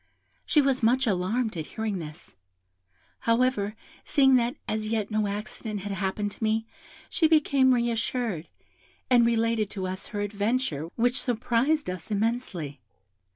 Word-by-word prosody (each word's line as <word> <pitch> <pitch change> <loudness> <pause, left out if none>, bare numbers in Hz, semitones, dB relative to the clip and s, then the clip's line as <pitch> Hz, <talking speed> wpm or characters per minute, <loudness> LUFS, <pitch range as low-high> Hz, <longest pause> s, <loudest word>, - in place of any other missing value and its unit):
She 295 - +4
was 270 -1 +1
much 250 +4 +3
alarmed 215 +3 0
at 155 - -4
hearing 215 -4 -1
this; 155 0 -9 0.8
however, 230 -3 +1 0.3
seeing 275 -3 +4
that 240 +2 0
as 215 0 -2
yet 220 -1 -1
no 215 -1 +1
accident 210 0 -4
had 205 +1 -5
happened 195 +2 -2
to 225 - -8
me, 220 +1 +1 0.4
she 320 - +2
became 285 -4 +4
re 240 -1 +2
assured, 225 -6 -2 0.6
and 240 -2 +6
related 230 -2 +1
to 190 -3 -4
us 185 +1 -5
her 205 - -4
adventure, 205 - -1
which 245 +2 +2
surprised 250 +5 +1
us 180 +1 -5
immensely. 200 - -2
220 Hz, 145 wpm, -27 LUFS, 200-245 Hz, 0.8 s, and